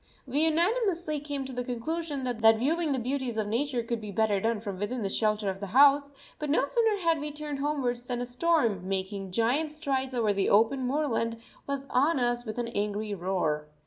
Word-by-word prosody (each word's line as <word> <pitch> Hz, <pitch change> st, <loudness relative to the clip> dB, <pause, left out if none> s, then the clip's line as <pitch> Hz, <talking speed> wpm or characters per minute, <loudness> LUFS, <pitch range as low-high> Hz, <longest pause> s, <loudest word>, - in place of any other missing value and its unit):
We 270 Hz, +2 st, -1 dB
unanimously 340 Hz, -2 st, +1 dB
came 285 Hz, -2 st, -4 dB
to 265 Hz, -, -7 dB
the 250 Hz, 0 st, -2 dB
conclusion 285 Hz, +4 st, -3 dB
that 225 Hz, -3 st, +4 dB
viewing 310 Hz, +6 st, 0 dB
the 270 Hz, -, +1 dB
beauties 255 Hz, -1 st, -2 dB
of 215 Hz, -, 0 dB
nature 240 Hz, +3 st, -1 dB
could 230 Hz, -1 st, -3 dB
be 210 Hz, -, -7 dB
better 205 Hz, -1 st, +1 dB
done 225 Hz, 0 st, 0 dB
from 200 Hz, -3 st, -6 dB
within 230 Hz, +3 st, -2 dB
the 195 Hz, -, -1 dB
shelter 215 Hz, 0 st, 0 dB
of 190 Hz, 0 st, -2 dB
the 200 Hz, -, -5 dB
house, 280 Hz, +5 st, +5 dB, 0.3 s
but 300 Hz, -, -3 dB
no 285 Hz, -1 st, +3 dB
sooner 445 Hz, +4 st, +2 dB
had 330 Hz, -2 st, +2 dB
we 295 Hz, +1 st, -4 dB
turned 295 Hz, -1 st, -5 dB
homewards 255 Hz, -4 st, -1 dB
than 245 Hz, -1 st, -2 dB
a 245 Hz, -, -2 dB
storm, 245 Hz, -, +1 dB
making 195 Hz, 0 st, -3 dB
giant 240 Hz, +10 st, +1 dB
strides 270 Hz, -4 st, -2 dB
over 220 Hz, -4 st, +2 dB
the 195 Hz, -1 st, +1 dB
open 240 Hz, +5 st, +3 dB
moorland, 240 Hz, -5 st, -1 dB, 0.3 s
was 280 Hz, -1 st, -3 dB
on 290 Hz, +5 st, +3 dB
us 240 Hz, 0 st, 0 dB
with 215 Hz, 0 st, -5 dB
an 240 Hz, -1 st, -2 dB
angry 210 Hz, -1 st, -2 dB
roar. 175 Hz, -5 st, -1 dB
245 Hz, 205 wpm, -28 LUFS, 215-290 Hz, 0.3 s, house